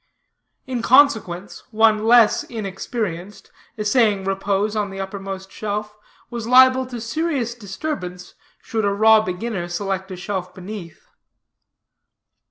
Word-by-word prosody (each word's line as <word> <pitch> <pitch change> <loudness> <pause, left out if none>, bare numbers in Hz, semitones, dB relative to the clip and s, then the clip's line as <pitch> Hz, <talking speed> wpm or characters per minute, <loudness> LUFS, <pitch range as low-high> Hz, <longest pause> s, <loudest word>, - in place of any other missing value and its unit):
In 255 -2 -3
consequence, 225 -9 +3
one 220 -1 +3
less 230 -1 +5
inexperienced, 200 -3 -5 0.3
essaying 210 -2 +2
repose 195 +2 -1
on 210 -2 -1
the 195 0 -8
uppermost 195 0 -6
shelf, 210 0 -4 0.4
was 235 -2 -5
liable 260 +1 +6
to 245 -2 -6
serious 245 0 -2
disturbance, 190 -4 -6 0.3
should 220 -1 -2
a 200 - +2
raw 220 +2 +5
beginner 185 -1 -4
select 190 +2 -3
a 185 - -6
shelf 180 0 -5
beneath. 185 -2 -9
210 Hz, 115 wpm, -21 LUFS, 195-230 Hz, 0.4 s, liable